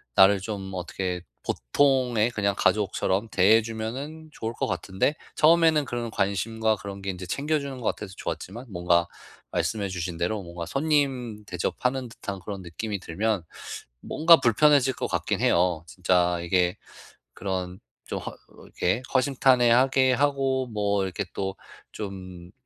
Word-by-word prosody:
나를 95 +1 +7
좀 95 -2 -5
어떻게 90 0 -3 0.2
보통의 120 - +2
그냥 100 -3 0
가족처럼 105 0 +1
대해 105 +4 +5
주면은 130 +9 -6
좋을 110 - -4
것 - - -2
같은데 95 - 0 0.2
처음에는 160 -2 +5
그런 120 -2 -3
관심과 110 +2 0
그런 100 0 -8
게 95 - -1
인제 90 0 -8
챙겨 150 - 0
주는 140 -2 -6
것 - - -9
같아서 95 -2 -9
좋았지만 95 +9 -5
뭔가 85 -1 +2 0.4
말씀해 105 -3 -1
주신 90 -2 -4
대로 100 +5 -1
뭔가 85 -1 -7
손님 135 - 0
대접하는 125 +7 -2
듯한 100 -3 -6
그런 100 -2 -6
느낌이 100 +4 -4
들면 100 +2 -1 0.6
뭔가 165 +1 +5
불편해질 135 +2 +4
것 - - -3
같기는 - - -1
해요. 85 -2 +2
진짜 90 0 +1
이게 90 +1 +1 0.6
그런 95 -1 -4 0.3
좀 - - -4
허 - - -5
어 - - -14 0.3
이렇게 95 +7 -1
허심탄회하게 130 0 +4
하고 135 -1 +1
뭐 100 -3 0
이렇게 95 +1 -3
또 95 -1 -3 0.4
좀 95 -3 -8
105 Hz, 305 characters per minute, -26 LUFS, 95-130 Hz, 0.6 s, 나를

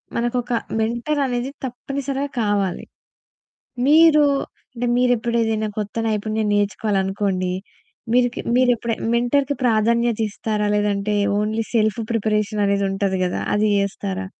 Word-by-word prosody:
మనకొక 240 +1 -1 0.3
మెంటర్ 240 +7 -1
అనేది 250 +1 -2
తప్పనిసరిగా 275 +2 -4
కావాలి. 205 -4 -1 1.0
మీరు 305 0 +6 0.5
అంటే 245 0 -2
మీరెప్పుడేదైనా 235 -3 +1
కొత్త 210 +1 -4
నైపుణ్యం 215 0 -1
నేర్చుకోవాలనుకోండి. 195 -2 0 0.6
మీరుకి 245 0 +2 0.2
మీరెప్పుడైనా 240 -3 +1
మెంటర్‌కి 270 +4 +1
ప్రాధాన్యతిస్తారా? 220 -2 +1
లేదంటే 205 0 0 0.3
ఓన్లీ 215 +2 -1
సెల్ఫ్ 215 -1 +2
ప్రిపరేషన్ 210 -1 0
అనేదుంటది 195 -1 0
కదా! 180 - -2 0.2
అది 215 +1 +2
చేస్తారా? 195 -1 -3
220 Hz, 95 wpm, -21 LUFS, 205-245 Hz, 1.0 s, మీరు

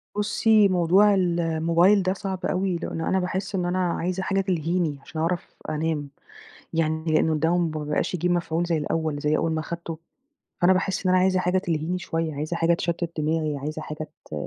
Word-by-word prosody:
بصي 210 0 +4
موضوع 185 +3 +4
الموبايل 170 +1 +3
ده 185 - +1
صعب 190 -1 -4
أوي، 185 0 0
لأنه 165 -1 -3
أنا 190 - +2
باحس 190 +2 -3
إن 180 -1 0
أنا 180 +1 0
عايزة 185 +2 -2
حاجة 195 0 +1
تلهيني 170 -4 -1
عشان 155 +2 -6
أعرف 175 +1 -2
أنام، 155 -2 -2 0.6
يعني 160 -1 0
لأنه 160 0 +2
الدوا 165 +3 +2
م 170 -2 +1
ما 150 - -4
بقاش 150 +4 -1
يجيب 180 +1 0
مفعول 170 -1 0
زي 170 -1 +1
الأول، 155 -1 -1
زي 150 +1 +1
أول 165 0 0
ما 155 0 -1
خدته، 170 -1 -6 0.6
فأنا 175 +2 +5
باحس 190 0 -1
إن - - +3
أنا 185 - +5
عايزة 185 0 +3
حاجة 180 +1 +1
تلهيني 170 +1 -2
شوية، 165 -3 -3
عايزة 155 +4 -3
حاجة 170 +1 +3
تشتت 170 0 -2
دماغي، 155 -1 0
عايزة 155 +3 -5
حاجة 155 0 -6 0.2
ت - - -21
170 Hz, 190 wpm, -25 LUFS, 160-185 Hz, 0.6 s, فأنا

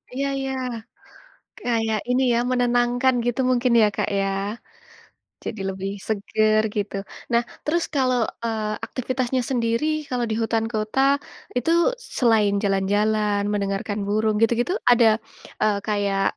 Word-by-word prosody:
Iya 275 +1 0
iya. 270 0 -3 1.1
Kayak 225 -2 0
ini, 250 +1 +2
ya, 235 - +2
menenangkan 245 +1 +2
gitu 245 +1 -1
mungkin, 250 0 +2
ya, 215 - +6
Kak, - - -1
ya? 195 - +1 1.2
Jadi 215 - -5
lebih 195 +1 -4 0.2
segar, 215 +1 +2
gitu. 205 -1 -2 0.4
Nah, 235 0 +4 0.2
terus 335 +3 +1
kalau, 255 -2 +2 0.3
eee, 215 -2 -1
aktivitasnya 255 0 -1
sendiri, 230 +2 0 0.2
kalau 250 -1 0
di - - 0
hutan 225 0 0
kota, 215 +4 -1 0.6
itu 250 - -1 0.5
selain 220 -5 +3
jalan-jalan, 205 +1 +1
mendengarkan 205 +1 -2
burung 215 +1 +1
gitu-gitu, 240 +7 +2 0.2
ada, 240 -1 +6 0.6
eee, 210 -1 +3
kayak 200 -2 0
225 Hz, 125 wpm, -23 LUFS, 210-245 Hz, 1.2 s, ya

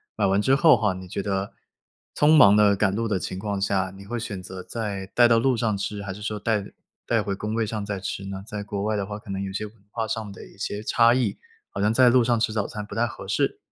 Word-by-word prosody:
买 - - +1
完 95 +1 +2
之 130 +5 +3
后 160 +3 +6
哈， 105 -4 +1
你 95 0 -9
觉 100 +2 -4
得 100 0 -2 0.6
匆 150 +2 +5
忙 100 -9 +8
地 105 -1 +5
赶 100 -1 +1
路 115 +3 -1
的 105 -3 0
情 95 0 -5
况 100 0 -3
下， 95 -1 0
你 100 - -11
会 120 +4 -4
选 100 -4 -5
择 95 0 -7
再 100 -2 -4
带 120 +4 +4
到 115 -1 +4
路 130 +1 +2
上 110 -2 0
吃， 100 +1 -4
还 95 -1 -5
是 105 - -11
说 105 0 -3
带 105 -1 0 0.4
带 115 -3 +2
回 100 -1 -2
工 105 +2 -4
位 115 -1 +1
上 110 -1 -4
再 100 -1 -3
吃 95 +1 -5
呢？ 95 0 -6
在 105 -2 -5
国 100 -1 -4
外 110 +1 0
的 100 - -1
话 105 0 -5
可 105 -2 -10
能 95 0 -3
有 100 -1 -4
些 100 +2 -3
文 105 +1 -12 0.2
化 115 -1 -2
上 110 -2 -4
的 100 - -11
一 - - -18
些 105 +1 -4
差 115 +2 +4
异， 130 - 0 0.3
好 - - -4
像 105 +1 +3
在 125 +2 +5
路 125 0 +5
上 120 -1 +2
吃 110 -1 0
早 105 -2 -1
餐 105 -1 -6
不 - - -10
太 120 +1 +1
合 - - -9
适。 - - 0
105 Hz, 295 characters per minute, -25 LUFS, 100-115 Hz, 0.6 s, 忙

